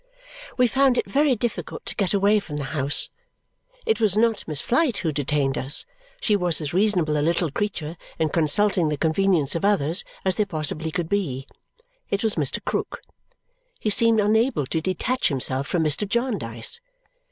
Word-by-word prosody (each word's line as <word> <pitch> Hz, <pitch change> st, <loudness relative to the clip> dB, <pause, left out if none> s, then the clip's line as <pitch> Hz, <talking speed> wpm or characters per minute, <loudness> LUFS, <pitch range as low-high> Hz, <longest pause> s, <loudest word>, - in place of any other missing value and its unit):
We 250 Hz, -, +4 dB
found 265 Hz, +1 st, +2 dB
it -, -, +1 dB
very 285 Hz, -1 st, +2 dB
difficult 235 Hz, 0 st, -4 dB
to -, -, -6 dB
get 195 Hz, -3 st, -1 dB
away 205 Hz, +1 st, +3 dB
from 150 Hz, -7 st, -7 dB
the 145 Hz, -, -3 dB
house. 140 Hz, -1 st, +1 dB, 0.7 s
It 445 Hz, -, 0 dB
was 210 Hz, -2 st, +2 dB
not 225 Hz, -1 st, +1 dB
Miss 155 Hz, -3 st, -3 dB
Flite 260 Hz, -, +1 dB
who 160 Hz, -, +1 dB
detained 140 Hz, -1 st, -1 dB
us; 135 Hz, +3 st, +1 dB, 0.3 s
she 220 Hz, -3 st, +1 dB
was 175 Hz, -5 st, +3 dB
as 150 Hz, -1 st, -5 dB
reasonable 180 Hz, -6 st, +2 dB
a -, -, 0 dB
little 170 Hz, 0 st, 0 dB
creature 170 Hz, -4 st, -4 dB, 0.2 s
in 160 Hz, -, 0 dB
consulting 170 Hz, +2 st, +2 dB
the 150 Hz, -, -2 dB
convenience 160 Hz, -2 st, +2 dB
of 165 Hz, -, -3 dB
others 185 Hz, -4 st, +2 dB, 0.2 s
as 190 Hz, -, +3 dB
there 210 Hz, 0 st, 0 dB
possibly 155 Hz, -2 st, -1 dB
could 170 Hz, 0 st, -3 dB
be. 150 Hz, -10 st, -2 dB, 0.6 s
It 200 Hz, -, -1 dB
was 220 Hz, -2 st, +1 dB
Mr. 145 Hz, -5 st, 0 dB
Krook. -, -, -3 dB, 0.8 s
He 215 Hz, -, 0 dB
seemed 230 Hz, 0 st, +4 dB
unable 220 Hz, -, +2 dB
to 160 Hz, +5 st, -2 dB
detach 190 Hz, +9 st, -1 dB
himself 135 Hz, -1 st, 0 dB
from 170 Hz, -3 st, 0 dB
Mr. 155 Hz, +7 st, +1 dB
Jarndyce. 205 Hz, -, -1 dB
180 Hz, 175 wpm, -23 LUFS, 150-215 Hz, 0.8 s, We